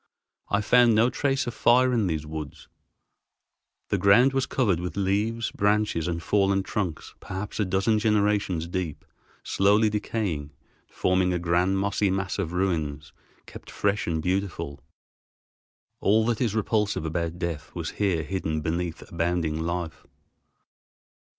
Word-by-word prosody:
I 100 - +1
found 120 +1 +5
no 115 +3 +4
trace 135 +1 0
of 120 - -4
fire 125 +2 +4
in 110 -5 +1
these 80 -3 -2
woods. 75 -1 -7 1.2
The - - 0
ground 120 +7 +5
was 135 -1 0
covered 100 -10 +1
with 90 +2 -5
leaves, 105 +4 0
branches, 105 -5 +1
and 85 -1 -3
fallen 95 -1 +2
trunks 95 -5 -4
perhaps 95 +4 -6
a 105 - +2
dozen 95 +4 +1
generations 105 -6 +1
deep, 85 -4 -4 0.4
slowly 105 +2 +3
decaying, 95 -9 -3 0.4
forming 90 0 +1
a - - +1
grand 90 +3 +1
mossy 100 +1 +1
mass 95 +1 -2
of 85 -4 -2
ruins, 80 -6 -2 0.3
kept - - -12
fresh 100 +1 -1
and 80 -2 -1
beautiful. 90 -6 -2 1.2
All 110 +2 +3
that 115 0 0
is 115 -4 0
repulsive 105 -4 0
about 85 +1 -2
death 85 -4 -4
was 85 -3 -4
here 90 -6 +1
hidden 80 -4 -2
beneath 85 +2 -3
abounding 85 -2 -1
life. 85 0 -4
95 Hz, 135 wpm, -26 LUFS, 85-105 Hz, 1.2 s, found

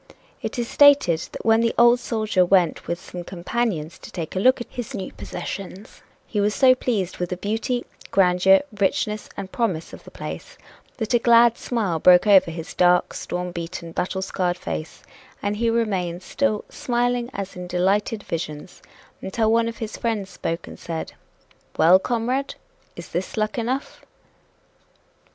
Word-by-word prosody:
It - - -4
is 240 -1 -1
stated 285 - +5
that - - -8
when 225 0 +5
the 230 0 +1
old 240 +1 +6
soldier 215 -5 +1
went 180 -2 +2
with 170 0 -2
some 175 -1 -8
companions 175 -2 -3
to - - -11
take 170 -2 -6
a - - 0
look 255 +6 +4
at 240 - -5
his 245 +1 -6
new 190 - -5
possessions, 195 +1 -7 0.2
he 210 - -1
was 210 +1 +1
so 260 -2 +6
pleased 205 -8 -2
with 180 -1 -2
the 180 - -3
beauty, 225 +5 -2 0.2
grandeur, 190 0 +4 0.2
richness 210 +2 0
and 190 -1 -6
promise 190 -9 -2
of - - -11
the - - -12
place - - -8 0.4
that 220 -1 -2
a 240 - +5
glad 235 0 +5
smile 205 -12 -2
broke 180 +3 +6
over 195 -4 +6
his 165 -1 -7
dark, 180 0 +3
storm 180 0 -4
beaten, 170 0 -6
battle 190 +3 -2
scarred 180 -2 -1
face, 80 - -6 0.4
and 205 +1 -1
he 230 +1 +1
remained 190 -6 -1
still 215 -4 -1
"smiling 245 0 -1
as 195 -3 -6
in 180 0 -7
delighted 200 +4 0
visions," 155 0 -6 0.4
until 220 +3 0
one 230 0 +3
of 230 - -5
his 220 -1 -5
friends 215 -4 -2
spoke 165 +1 -4
and - - -11
said: 165 -1 -5 0.6
"Well, 175 +4 +6
comrade! 245 +5 -1 0.4
Is 170 - -9
this 180 +6 -4
luck 215 +2 -1
enough?" 255 +4 -3
200 Hz, 165 wpm, -23 LUFS, 180-230 Hz, 0.6 s, old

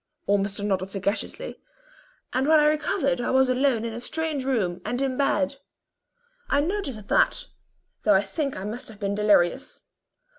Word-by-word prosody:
(Ormiston 200 0 0
nodded 190 -1 -1
sagaciously), 200 +1 -3 0.7
"and 260 +2 +1
when 315 0 +6
I 300 - +4
next - - +5 0.2
recovered 275 -9 +1
I - - -1
was 265 0 +4
alone 255 -3 +2
in 230 - -4
a 230 - -5
strange 310 +2 -2
room, 210 -10 -1
and 240 +4 -2
in 270 -1 0
bed. 280 0 +1 0.9
I 285 - +3
noticed 290 - -2
that, - - +2 0.6
though 210 -2 +4
I 190 - +5
think 275 +8 -3
I 190 - -5
must 220 +5 -5
have 215 -2 -13
been 200 -1 -1
delirious. 205 -4 +2
240 Hz, 165 wpm, -25 LUFS, 200-275 Hz, 0.9 s, when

